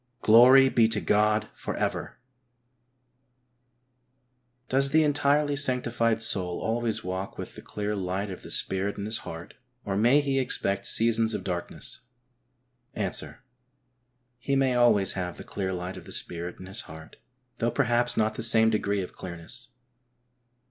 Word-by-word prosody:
Glory 125 +4 +7
be 115 -3 +3
to 110 -2 +1
God 105 +1 +1
for - - -6
ever! - - -3 2.5
Does 135 +1 +2
the 155 +3 +4
entirely 145 0 +1
sanctified 120 -4 +2
soul 90 -5 +1
always 115 0 -1
walk 95 +1 -5
with - - -7
the - - -11
clear 105 0 -4
light 95 +1 -3
of 90 - -8
the - - -11
Spirit 95 +2 0
in 100 - -5
his 110 +1 -1
heart, 80 -4 -9 0.3
or 100 -2 -2
may 120 +8 +4
he 140 -2 0
expect 100 -6 0
seasons 115 -1 +3
of - - -5
darkness? 90 -2 -4 0.9
Answer: 100 +5 -3 1.0
He 140 +3 -1
may 135 -2 +2
always 120 -6 +3
have 90 -3 -5
the - - -9
clear 95 -2 -4
light 90 0 -5
of - - -11
the - - -12
Spirit 85 +1 -4
in 95 - -9
his 95 +5 -5
heart, 80 0 -12 0.4
though 115 - +1
perhaps 120 -1 0
not 110 0 +1
the - - -6
same 110 0 +5
degree 100 -2 -1
of - - -10
clearness. 90 +8 -9
110 Hz, 150 wpm, -26 LUFS, 95-120 Hz, 2.5 s, Glory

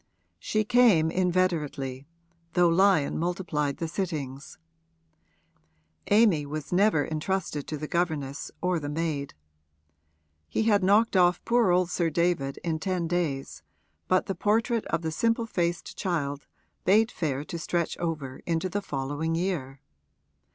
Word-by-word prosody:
She 215 - 0
came 210 -9 +4
inveterately, 160 -8 -1 0.5
though 175 -1 +4
Lyon 180 -4 +3
multiplied 165 -5 -1
the 165 - -3
sittings: 155 -6 -4 1.5
Amy 205 -8 +4
was 150 +2 -5
never 185 -5 +3
entrusted 155 -2 -2
to 155 - -4
the 150 +1 -5
governess 150 -5 -2
or 180 -2 +1
the 145 -1 -5
maid. 150 -2 -3 1.1
He - - 0
had 205 -3 +3
knocked 205 +3 +4
off 180 -1 +3
poor 235 -4 +3
old 180 0 +2
Sir 170 -2 +1
David 160 -4 0
in 160 -2 -1
ten 180 -1 -1
days, 160 -6 -2 0.5
but 185 0 +2
the 195 - -2
portrait 220 +5 +1
of 170 0 -1
the 160 - -2
simple 230 +7 +1
faced 175 -5 -2
child 145 -6 -2 0.4
bade 215 +4 +4
fair 145 -5 -2
to 170 +2 -6
stretch 170 0 -1
over 155 -6 -4
into 170 +2 0
the 205 +3 -2
following 145 0 -2
year. 160 -7 -3
170 Hz, 135 wpm, -27 LUFS, 150-185 Hz, 1.5 s, came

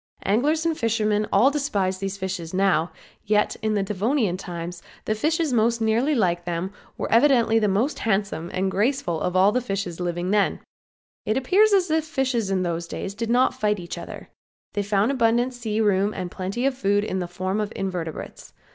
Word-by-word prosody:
Anglers 295 +11 +2
and 330 -1 +1
fishermen 215 -4 0
all 235 +8 +5
despise 200 -11 -1
these 195 0 -3
fishes 185 -3 -4
now, 185 -4 +2 0.3
yet 210 0 +1
in 215 -1 0
Devonian 205 +2 0
times 175 -2 -6 0.2
the 215 - +1
fishes 310 +5 0
most 230 0 +2
nearly 230 +7 +2
like 175 -6 +1
them 175 +2 -3 0.2
were - - -4
evidently 235 -2 +4
the 210 - +2
most 215 +9 0
handsome 195 -6 -1
and 190 +1 -1
graceful 205 - 0
of 180 - -1
all 195 +3 +5
fishes 195 -6 -3
then 180 - -3
living. 180 +4 0 0.7
It 215 +3 +1
appears 390 +12 +4
as 375 -4 +3
if 315 0 +2
fishes 260 -8 -1
in 190 -1 +1
those 170 -1 -2
days 195 - -5
did 225 +2 -4
not 250 +2 +3
fight 210 -1 0
each 170 -1 -6
other. - - -9 0.4
They 205 - 0
found 205 +4 +1
abundant 240 0 +2
sea 225 -3 -3
room 205 0 +2
and 180 -2 -4
plenty 195 +7 -3
of 275 -1 +1
food 205 -4 +1
in 190 -3 -2
the 180 - -3
form 185 +4 -2
of 210 0 -3
invertebrates. 180 -4 -5
210 Hz, 180 wpm, -24 LUFS, 185-240 Hz, 0.7 s, all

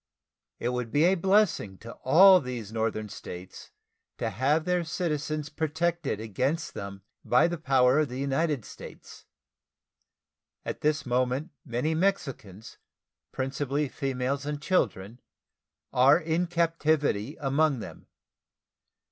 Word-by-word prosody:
It 120 - -2
would 125 -2 -3
be 145 - +3
a 180 +3 +5
blessing 190 - +2
to 115 +3 -10
all 185 +7 +8
these 120 -5 -6
northern 110 -1 -1
States 90 -2 -9 0.5
to 115 - -2
have 140 +9 +1
their 180 -1 +1
citizens 155 -3 -3
protected 160 -4 -1
against 130 - -2
them 100 -1 -7 0.2
by 125 +6 +4
the 170 -1 -4
power 130 -2 +3
of 150 -3 +1
the 125 - -6
United 140 -1 -1
States. - - -12 1.4
At - - -5
this 150 -1 +1
moment 130 +6 0
many 125 +7 -1
Mexicans, 135 - -2 0.5
principally 140 +2 -2
females 135 0 -2
and 145 0 -4
children, 120 - -1 0.7
are 135 +3 +6
in 165 +1 -1
captivity 155 -7 0
among 140 0 +1
them. 110 - -10
140 Hz, 120 wpm, -27 LUFS, 125-160 Hz, 1.4 s, all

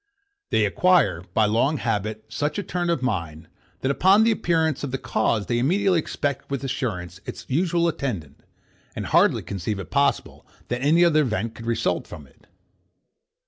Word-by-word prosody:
They 110 - +2
acquire, 105 - +2
by 110 - +4
long 120 +8 +1
habit, 110 -2 -2
such 145 - -2
a 205 - -2
turn 175 0 -2
of 165 -6 0
mind, 85 -9 -3 0.3
that, 135 - +1
upon 190 +8 +5
the 230 - +4
appearance 160 - 0
of 140 - -2
the 135 - -2
cause, 110 -3 0
they 120 -1 0
immediately 180 +6 +2
expect 145 -3 -3
with 140 -2 -3
assurance 95 -9 -4
its - - -7
usual 170 +4 +1
attendant, 100 - -4 0.5
and - - -4
hardly - - +3
conceive 100 +2 -4
it 95 -4 -8
possible 140 0 0 0.3
that 120 +1 -2
any 160 +5 +4
other 155 -2 +4
event 115 -4 -2
could 115 0 -10
result 115 - -1
from - - -10
it. - - -25
130 Hz, 170 wpm, -24 LUFS, 110-165 Hz, 0.5 s, upon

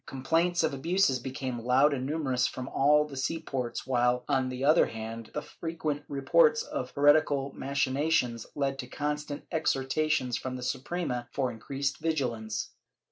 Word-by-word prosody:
Com 130 -1 -7
plaints 170 +4 +2
of - - +1
abuses 160 -1 +2
became 130 -1 -4
loud 130 +5 +4
and 130 -1 -2
numerous 135 -5 0
from 130 0 -6
all 150 +3 +4
the 145 -2 -9
sea 135 +5 -1
ports 130 -6 -4
while, 125 -1 +1
on 130 -1 +1
the 130 +1 -3
other 155 +4 +5
hand, 115 0 -7
the - - -2
frequent 160 -3 -4
reports 460 - +3
of - - -4
heretical 145 -1 +3
machinations 135 -3 0
led 135 -1 -1
to 125 - -5
constant 150 0 -3
exhortations 145 -3 0
from 130 -1 -5
the 125 - -6
Suprema 130 -2 -2
for 130 -3 -1
increased 135 +4 -3
vigilance. 125 -9 -2
135 Hz, 155 wpm, -29 LUFS, 125-150 Hz, -, other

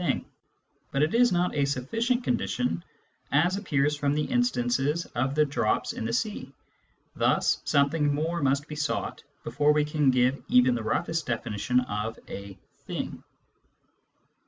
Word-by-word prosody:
thing. - - 0 0.7
But 140 - +2
it 155 - +1
isjipt.ajaj^o^t^ 175 - +1
c 250 +1 +3
ondition, 125 - -1 0.5
as 170 +6 +3
a 200 - -4
ppears 145 -6 +1
from 145 0 +1
the 150 - +1
instance 190 - +1 0.3
of 130 +3 -2
the 150 0 +4
dr 140 -4 -2
ops - - 0
in - - -5
the 115 - -1
sea. 135 - -2 0.6
1 - - +2
hul - - +3
sometnmg 145 +1 +1
more 160 +4 -1
must 140 +2 +1
be 150 - -6
sought 150 -1 -2 0.2
before 150 +1 +2
we 150 0 +2
can 150 -2 +2
give 130 +1 +2
even 125 0 +5
the 120 - -2
roughest 160 +8 -1
definition 120 +1 0
of 110 -1 -4
a 100 -1 -8
" - - -39
thing." - - -5
140 Hz, 160 wpm, -27 LUFS, 125-155 Hz, 0.7 s, even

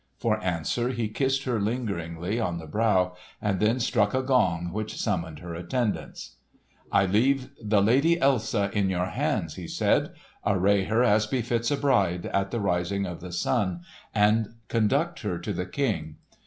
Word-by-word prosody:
For 110 -2 0
answer 90 - -1
he 120 -4 -2
kissed 135 +4 0
her 125 -4 0
lingeringly 100 -4 -2
on 90 -6 -1
the 80 - -7
brow 90 0 +1 0.2
and 100 -3 -1
then 110 +4 +2
struck 110 -2 +1
a 130 - +1
gong 90 -10 +1
which 110 +1 -4
summoned 85 -7 -2
her 85 +1 -7
attendants. 90 - -3 0.5
"I 100 -1 +4
leave 125 +7 +2
the 105 -2 +2
Lady 140 +10 +4
Elsa 115 -8 +1
in 100 -2 +1
your 90 -1 0
hands," 90 - -2
he - - -6
said. - - +1 0.3
"Array 100 0 +2
her 110 +4 +2
as 105 -3 +3
befits 120 -1 0
a 145 - +1
bride, 100 -12 +1
at 100 0 0
the 115 - -2
rising 100 0 0
of 90 -2 -6
the 90 0 -7
sun, 95 -1 0 0.3
and 105 +2 +2
conduct 140 +10 +1
her 95 -5 -2
to 85 - -4
the 90 - -3
King. 90 - -2
105 Hz, 170 wpm, -26 LUFS, 90-120 Hz, 0.5 s, I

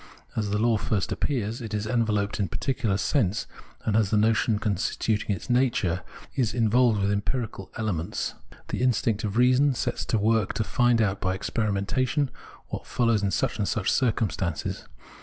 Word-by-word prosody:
As 105 -2 -1
the 105 - 0
law 115 +1 +3
first 105 -2 -1
appears, 115 -5 -1
it 110 -2 -4
is 105 0 -2
enveloped 110 -3 0
in 100 - +1
particulars 110 -1 -1
of - - -1
sense, 110 -7 +1 0.4
and 105 - +1
the 110 -1 +3
notion 110 0 +3
constituting 105 0 0
its 85 - -9
nature 120 -9 +1 0.3
is 120 -4 0
involved 115 -1 +3
with 100 0 +1
empirical 100 -1 -3
elements. 90 -7 -2 0.4
The - - -2
instinct 115 -3 +1
of 105 0 -2
reason 130 +3 +4
sets - - -2
to 115 - +1
work 110 -1 +2
to 110 - 0
find 120 -1 +3
out 95 -2 -1
by 95 0 0
experiment 100 0 -1 0.8
what - - -6
follows 115 -3 +2
in 100 - +1
such 95 - -1
and 100 - 0
such 100 - 0
circumstances. 105 - -1
110 Hz, 165 wpm, -26 LUFS, 100-115 Hz, 0.8 s, reason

